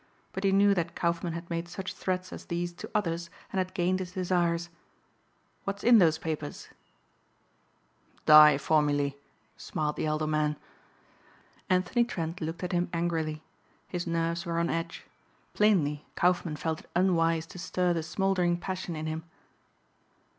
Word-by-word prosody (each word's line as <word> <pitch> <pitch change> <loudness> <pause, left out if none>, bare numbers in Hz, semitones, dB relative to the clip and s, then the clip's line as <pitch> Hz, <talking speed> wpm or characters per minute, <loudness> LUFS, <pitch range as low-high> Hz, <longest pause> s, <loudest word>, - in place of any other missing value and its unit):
But 190 - -4
he 195 - +3
knew 200 +1 +5
that 170 -3 -2
Kaufmann 170 0 -1
had 170 +1 -6
made 170 0 -2
such 185 +2 -5
threats 185 -1 -3
as - - -9
these 175 0 -3
to - - -9
others 170 -4 -1 0.2
and 190 - +1
had 185 0 -2
gained 185 +1 +1
his 180 -1 -6
desires. 175 -2 0 0.9
"What's 200 +1 -4
in 235 -1 +7
those 160 -4 +4
papers?" 155 -2 -5 1.6
"Dye 150 -1 +9
formulae," 145 -1 +1 0.4
smiled 150 -1 -3
the - - -1
elder 155 0 0
man. 155 -1 0 1.1
Anthony 185 +6 +3
Trent 170 -6 -4
looked 165 +3 -4
at 180 - -2
him 175 -1 0
angrily. 160 -2 -1 0.5
His 175 -1 -3
nerves 170 0 -1
were 170 -2 -2
on 170 0 +1
edge. 165 0 -4 0.5
Plainly 160 -9 +2
Kaufmann 175 -3 +1
felt 160 +1 -2
it - - -18
unwise 165 -3 +2
to 180 - -11
stir 180 0 0
the 165 - -1
smouldering 175 +1 +1
passion 185 -1 -4
in 155 0 -4
him. 160 +1 -3
170 Hz, 150 wpm, -29 LUFS, 160-185 Hz, 1.6 s, Dye